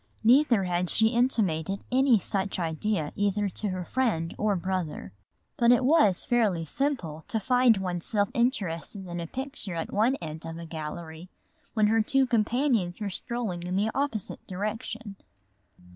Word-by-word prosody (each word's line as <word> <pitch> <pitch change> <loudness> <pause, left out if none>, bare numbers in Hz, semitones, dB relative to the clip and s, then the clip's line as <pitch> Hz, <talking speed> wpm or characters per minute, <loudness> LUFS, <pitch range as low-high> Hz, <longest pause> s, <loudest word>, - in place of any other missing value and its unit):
Neither 240 -3 +5
had 180 -1 -1
she 220 0 +3
intimated 200 -8 0
any 260 -2 +5
such 195 0 -1
idea 165 0 -1
either 205 0 +1
to 205 +3 -3
her 185 -1 -4
friend 190 -11 0
or 210 -1 +1
brother. 175 - -3 0.4
But 235 0 +5
it 245 +1 +4
was 265 - +4
fairly 210 -9 +1
simple 170 - -2
to 225 - -1
find 245 0 +4
one 180 -2 -3
self 205 +1 +1
interested 200 - -1
in 175 -1 -5
a 170 - -4
picture 265 - -6
at 165 - -4
one 230 +6 +3
end 160 - -7
of 165 0 -6
a 170 - -7
gallery 160 +1 -7 0.5
when 215 -2 +4
her 220 +1 +3
two 270 +5 +3
companions 230 -5 +1
were 205 -2 -3
strolling 220 -4 -3
in 180 +1 -3
the 210 +3 +1
opposite 270 -8 -2
direction. 210 +2 -5
205 Hz, 160 wpm, -27 LUFS, 175-235 Hz, 0.5 s, Neither